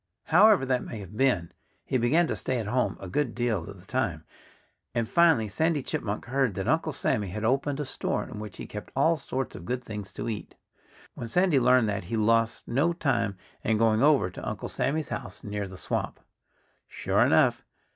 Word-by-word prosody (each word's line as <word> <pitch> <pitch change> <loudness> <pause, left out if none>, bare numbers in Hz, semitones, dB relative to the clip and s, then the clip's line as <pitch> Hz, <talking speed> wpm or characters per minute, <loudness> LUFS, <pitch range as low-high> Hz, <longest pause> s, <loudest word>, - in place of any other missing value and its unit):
However 190 -2 +5
that 130 -1 0
may 115 - -7
have 100 0 -10
been, 110 -10 +1 0.3
he 130 - 0
began 150 +9 +3
to - - -2
stay 130 - -1
at 115 - -2
home 115 -2 0
a 95 - -7
good 120 +6 -1
deal 120 -4 -1
of 100 -2 -10
the 90 - -17
time. 95 -10 -2 0.7
And 115 -1 0
finally 165 -9 +4
Sandy 155 +6 0
Chipmunk 105 -1 -3
heard 130 -4 0
that - - -3
Uncle - - +1
Sammy 105 -2 -1
had 105 +5 -4
opened 135 +4 +1
a 150 - -2
store, - - -2
in 115 -5 -8
which 105 -2 -8
he - - -6
kept - - -8
all 165 +1 +4
sorts 135 -4 -4
of - - -8
good 125 +3 -2
things 105 -4 -7
to - - -5
eat. 110 -3 -5 0.6
When 120 - -6
Sandy 175 +2 +3
learned 125 -2 +4
that 100 -3 -3
he 115 +6 -2
lost 115 +1 +2
no 145 +8 +2
time 115 - 0 0.3
in 110 0 +2
going 110 0 +3
over 140 -10 +4
to - - -5
Uncle - - -5
Sammy's 150 +3 -1
house 95 +1 -6
near 105 -1 -3
the 95 0 -10
swamp. - - -3 0.7
Sure - - 0
enough! - - +4
120 Hz, 200 wpm, -27 LUFS, 105-135 Hz, 0.7 s, However